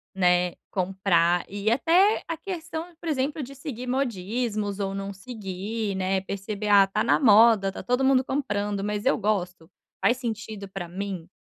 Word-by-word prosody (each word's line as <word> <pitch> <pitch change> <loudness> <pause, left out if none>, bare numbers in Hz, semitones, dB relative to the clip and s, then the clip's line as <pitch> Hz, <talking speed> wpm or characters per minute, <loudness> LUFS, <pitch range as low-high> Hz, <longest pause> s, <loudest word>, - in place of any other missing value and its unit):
né, 180 -1 +2 0.2
comprar 180 -2 +1
e 205 +2 -2
até 345 - +3
a 330 - -2
questão, 335 -1 -6
por 340 - -8
exemplo, 290 0 -1
de 275 +2 -9
seguir 265 -3 -7
modismos 220 -4 -2
ou 195 -1 -2
não 195 0 -4
seguir, 205 0 -5
né, 190 0 0
perceber: 200 +2 -5
"Ah, 200 -1 +7
tá 210 +2 0
na 235 - +3
moda, 220 -4 +6
tá - - -8
todo 250 +2 +1
mundo 265 -1 +4
comprando, 210 -8 -2
mas 210 0 -3
eu 270 - +3
gosto, 180 -5 -2 0.3
faz 240 - +3
sentido 220 -4 -5
para 190 -2 -6
mim, 185 -2 -5
210 Hz, 165 wpm, -26 LUFS, 195-255 Hz, 0.3 s, Ah